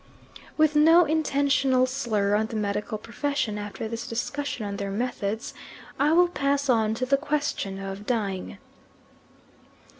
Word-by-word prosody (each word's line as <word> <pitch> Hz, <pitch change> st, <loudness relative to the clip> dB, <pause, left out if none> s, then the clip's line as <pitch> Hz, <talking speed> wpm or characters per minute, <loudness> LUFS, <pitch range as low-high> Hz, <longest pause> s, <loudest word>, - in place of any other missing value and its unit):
With 310 Hz, -1 st, +3 dB
no 325 Hz, +3 st, +6 dB
intentional 280 Hz, -4 st, +2 dB
slur 230 Hz, -6 st, 0 dB
on 215 Hz, +1 st, +2 dB
the 225 Hz, -, -7 dB
medical 210 Hz, +1 st, -2 dB
profession, 235 Hz, -1 st, -2 dB
after 205 Hz, +1 st, -5 dB
this 230 Hz, +1 st, -5 dB
discussion 250 Hz, 0 st, -3 dB
on 200 Hz, 0 st, -4 dB
their 200 Hz, 0 st, -3 dB
methods 220 Hz, 0 st, -3 dB, 0.5 s
I 290 Hz, +2 st, +3 dB
will 350 Hz, +2 st, +5 dB
pass 280 Hz, -3 st, 0 dB
on 220 Hz, -3 st, +2 dB
to 255 Hz, -, -2 dB
the 275 Hz, +2 st, +3 dB
question 285 Hz, -10 st, -2 dB
of 195 Hz, +1 st, -7 dB
dying. 200 Hz, -6 st, -2 dB
240 Hz, 140 wpm, -26 LUFS, 210-285 Hz, 0.5 s, no